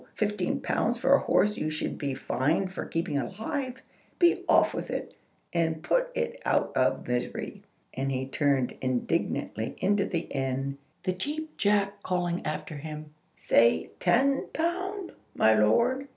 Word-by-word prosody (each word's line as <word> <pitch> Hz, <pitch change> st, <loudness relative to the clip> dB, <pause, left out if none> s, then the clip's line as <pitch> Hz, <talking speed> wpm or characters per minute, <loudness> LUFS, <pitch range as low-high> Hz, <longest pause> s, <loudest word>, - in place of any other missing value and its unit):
Fifteen 210 Hz, -1 st, -1 dB
pounds -, -, 0 dB
for -, -, +3 dB
a -, -, +7 dB
horse 210 Hz, 0 st, +2 dB
you 155 Hz, -, -1 dB
should 155 Hz, 0 st, -3 dB
be 140 Hz, -2 st, -2 dB
fined 155 Hz, +8 st, 0 dB
for -, -, -4 dB
keeping 165 Hz, -4 st, -1 dB
alive! 255 Hz, -, -4 dB, 0.3 s
Be 345 Hz, -1 st, +4 dB
off -, -, +5 dB
with -, -, -4 dB
it, -, -, -4 dB, 0.4 s
and 160 Hz, -2 st, 0 dB
put -, -, +2 dB
it 480 Hz, +1 st, -2 dB
out -, -, +1 dB
of -, -, +1 dB
misery." 125 Hz, 0 st, -3 dB, 0.3 s
And 135 Hz, +1 st, -2 dB
he 130 Hz, 0 st, -1 dB
turned 135 Hz, -2 st, +1 dB
indignantly 125 Hz, -3 st, -1 dB
into 200 Hz, +1 st, +2 dB
the 170 Hz, -, -1 dB
inn, 135 Hz, -1 st, -3 dB, 0.2 s
the 185 Hz, 0 st, 0 dB
Cheap 305 Hz, +11 st, -4 dB
Jack 200 Hz, -1 st, +1 dB
calling 175 Hz, -2 st, -1 dB
after 155 Hz, 0 st, -4 dB
him, 150 Hz, 0 st, -7 dB, 0.2 s
"Say 115 Hz, -9 st, +3 dB
ten 275 Hz, +3 st, +3 dB
pound, 365 Hz, +4 st, -2 dB, 0.2 s
my 110 Hz, -, +5 dB
lord!" 235 Hz, -, +3 dB
175 Hz, 150 wpm, -28 LUFS, -, 0.4 s, a